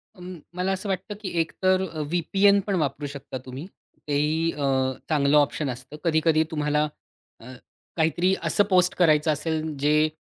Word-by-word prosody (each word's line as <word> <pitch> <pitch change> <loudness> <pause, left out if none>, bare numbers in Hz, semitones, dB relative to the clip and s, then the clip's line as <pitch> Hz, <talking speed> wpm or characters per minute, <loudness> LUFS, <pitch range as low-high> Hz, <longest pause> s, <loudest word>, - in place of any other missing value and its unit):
अं, 180 -2 -9 0.2
मला 180 +1 -1
असं 190 +2 -3
वाटतं, 190 +2 -3
की 195 - -4
एकतर 185 +3 +1
अ, 155 -1 -6
व्ही-पी-एन 195 +6 +2
पण 200 - 0
वापरू 145 -3 -2
शकता 140 -2 -7
तुम्ही, 130 +4 -7 0.4
तेही 150 +3 +1
अ, 145 -3 -3 0.4
चांगलं 150 -1 +3
ऑप्शन 145 0 +1
असतं. 125 +3 -8
कधी-कधी 160 -1 +3
तुम्हाला 150 -1 0 0.5
अ, 120 +3 -11 0.5
काहीतरी 170 +3 +2
असं 205 - +3
पोस्ट 180 -1 +3
करायचं 155 -3 +3
असेल, 155 +1 -1 0.2
जे 150 +2 +3
160 Hz, 155 wpm, -25 LUFS, 150-180 Hz, 0.5 s, चांगलं